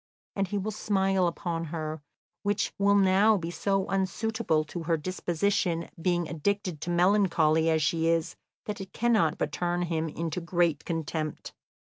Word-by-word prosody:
And 195 -1 0
he 205 - -2
will 205 +2 -2
smile 195 -3 +1
upon 165 -1 -3
her, 155 -1 -4 0.4
which 205 0 0
will 200 0 +4
now 200 +2 +5
be 170 -2 -4
so 195 +1 0
unsuitable 195 -3 0
to 170 +3 -6
her 165 0 +1
disposition, 175 +1 -1
being 175 -1 +1
addicted 170 0 -2
to 175 - -4
melancholy 170 -3 +3
as 160 -1 +2
she 165 +2 +1
is, 165 -1 +1 0.3
that 210 -1 -4
it 190 - -9
cannot 220 -9 +2
but 150 - -1
turn 175 +2 -1
him 165 -2 -1
into 165 +2 -3
great 170 -3 +1
contempt." 160 -2 -4
175 Hz, 155 wpm, -28 LUFS, 165-195 Hz, 0.4 s, now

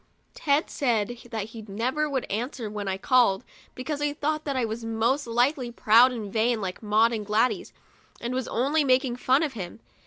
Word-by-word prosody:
Ted 290 +1 +1
said 230 -6 0 0.2
that 220 -2 -4
he 225 0 -9
never 255 +9 -1
would 265 -3 -1
answer 230 +1 -4
when 205 -1 -5
I 190 0 -1
called, 235 -1 +3 0.3
because 285 +3 -4
he 295 0 0
thought 305 +1 -2
that 280 -2 -2
I 255 -2 +1
was 225 +1 -5
most 230 +5 0
likely 245 +2 +1
proud 235 +2 +5
and 215 -5 -6
vain, 230 +1 +2
like 185 -3 -5
Maud 220 +2 +3
and 215 -2 -2
Gladys, 215 +4 0 0.5
and 240 +1 -4
was 260 -1 -2
only 285 +6 +1
making 255 -2 +2
fun 260 +4 +3
of 295 -4 -2
him. 190 -3 -7
240 Hz, 190 wpm, -26 LUFS, 220-265 Hz, 0.5 s, proud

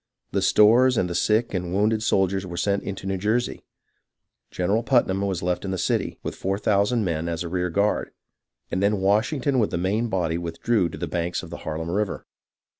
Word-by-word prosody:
The - - 0
stores 120 +4 +5
and 90 - +2
the 90 - -4
sick 110 +6 +1
and 90 -2 -2
wounded 110 +2 +2
soldiers 95 -2 +1
were 90 -2 -7
sent 100 +3 +1
into 95 -1 -6
New 95 -1 -2
Jersey. 110 +5 -1 0.9
General 100 +5 0
Putnam 115 -6 +2
was 95 -3 -2
left 90 0 -1
in 95 - -4
the 95 - -2
city, - - -1
with - - -3
four 95 +1 -2
thousand 105 +2 +1
men, 85 -1 -2
as 85 0 -3
a - - -4
rear 90 0 -1
guard, 100 +5 0 0.6
and 95 - -1
then 100 0 +2
Washington 125 +8 +1
with 110 - +2
the - - -2
main 100 +7 0
body 85 -5 -1
withdrew 85 +3 0
to - - -8
the - - -3
banks 85 +1 -2
of 85 - -10
the 85 - -5
Harlem 80 +1 -4
River. 100 +1 -2
95 Hz, 200 wpm, -24 LUFS, 90-105 Hz, 0.9 s, stores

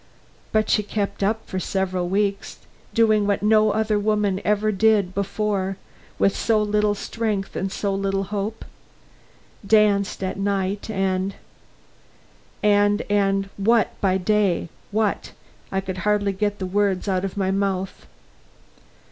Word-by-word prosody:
But 215 0 +2
she 210 - +3
kept 205 -1 -3
up 215 +3 0
for 190 - -3
several 185 -2 -1
weeks 200 +1 -1 0.3
doing 215 -3 +3
what 200 0 0
no 215 0 +4
other 215 0 +1
woman 205 -2 0
ever 210 +1 +1
did 205 -2 +2
before 200 -1 -1 0.4
with 195 - +2
so 225 -2 +2
little 210 0 +1
strength 210 -2 -3
and 190 +1 -2
so 200 0 -2
little 195 0 -1
hope. 205 +3 -4 1.0
Danced 200 -2 +2
at 185 - -3
night 195 +1 -1
and 195 -1 -1 0.8
" - - -32
"And 205 0 +3
and 195 -1 +1
what 225 +3 +3
by 190 -1 +2
day, 195 -3 +1 0.2
what?" 210 -1 -1 0.4
I 190 - 0
could 185 -1 -5
hardly 205 0 +1
get 205 +1 -1
the 190 - -4
words 195 0 0
out 185 -1 0
of 195 0 -4
my 190 -1 +1
mouth. 195 -1 -2
200 Hz, 140 wpm, -23 LUFS, 195-210 Hz, 1.0 s, no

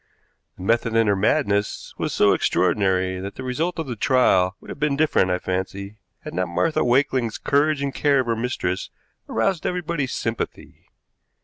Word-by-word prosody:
The - - -9
method 115 +2 +1
in 115 0 +4
her 100 -1 +3
madness 100 +1 0
was - - -1
so - - +4
extraordinary 95 -2 +1
that 100 +1 -6
the 130 - -7
result 155 +8 -2
of 160 - -2
the 125 -3 -5
trial 100 -7 +3
would - - -15
have - - -7
been 150 -1 +1
different, 150 -10 +2
I 90 - +1
fancy, 95 +3 -4 0.2
had - - -8
not 90 +1 -1
Martha 155 - +1
Wakeling's 125 -2 +1
courage 145 0 +1
and 140 -1 -2
care 140 -1 +3
of - - -5
her 115 -1 0
mistress 110 -6 -2 0.4
aroused 155 +10 0
everybody's 170 -6 -2
sympathy. 115 0 -5
115 Hz, 175 wpm, -23 LUFS, 95-140 Hz, 0.4 s, in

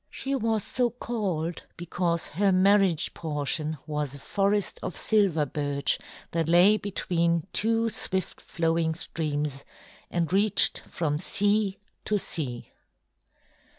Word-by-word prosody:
She 275 - -4
was 225 -5 0
so 245 -1 +1
called 200 -9 -3 0.2
because 170 0 -1
her 195 +5 +1
marriage 190 -3 +3
portion 155 0 -3
was 150 -3 -3
a - - -10
forest 200 +5 0
of - - -5
silver 195 -8 +2
birch 145 0 -1 0.3
that 165 -1 -1
lay 180 +5 +6
between 170 -5 0
two 225 +1 +1
swift 190 -4 -3
flowing 165 -1 0
streams 150 -4 -3 0.5
and 170 0 -1
reached 205 +1 +6
from 150 -3 -1
sea 205 +1 +1 0.3
to 210 - +1
sea. 135 -10 -4
175 Hz, 120 wpm, -27 LUFS, 155-205 Hz, 0.5 s, lay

